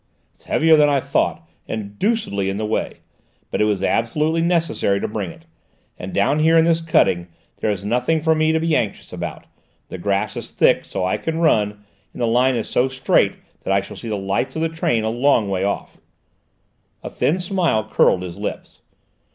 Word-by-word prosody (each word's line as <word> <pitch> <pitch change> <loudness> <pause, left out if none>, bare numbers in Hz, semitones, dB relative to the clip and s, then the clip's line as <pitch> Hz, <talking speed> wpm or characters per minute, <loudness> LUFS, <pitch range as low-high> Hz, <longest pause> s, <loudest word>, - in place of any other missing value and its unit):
"It's - - -27
heavier 160 0 +4
than 150 -1 +5
I 140 -1 +2
thought, - - -1 0.2
and 105 -2 -6
deucedly 200 - 0
in 95 - -3
the 110 - -2
way. 110 - -3 0.5
But - - -1
it - - +4
was 100 -3 0
absolutely 150 +11 +1
necessary 165 - +1
to - - -2
bring 105 -4 -4
it. 165 - -14 0.5
And 90 - -7
down 120 +9 +1
here 160 +2 +4
in 165 - +5
this 165 0 +2
cutting, 90 - +2 0.3
there 110 - -1
is 100 -1 -3
nothing 125 +9 +1
for 160 +1 +2
me 155 0 +2
to 160 - +1
be 165 -1 +1
anxious 105 -8 -3
about: - - -6 0.4
the 95 - -7
grass 100 +2 -1
is - - -6
thick, - - +2
so 90 - -3
I 95 - 0
can 160 0 -3
run, 105 -10 +1 0.3
and - - -11
the 120 - +1
line 125 +3 +3
is 115 - -2
so 125 - +1
straight 130 0 +2 0.3
that - - -2
I 100 - +4
shall 100 - -10
see 115 - -7
the 105 - -1
lights 100 +7 -2
of 160 - -1
the 165 - +1
train 120 -8 0
a 110 - 0
long 120 -3 +2
way 95 -1 -1
off." 100 - -3 1.1
A - - -5
thin 165 - +1
smile 175 - 0
curled 90 -3 +3
his 90 -2 -7
lips. - - -6
120 Hz, 205 wpm, -21 LUFS, 100-160 Hz, 1.1 s, than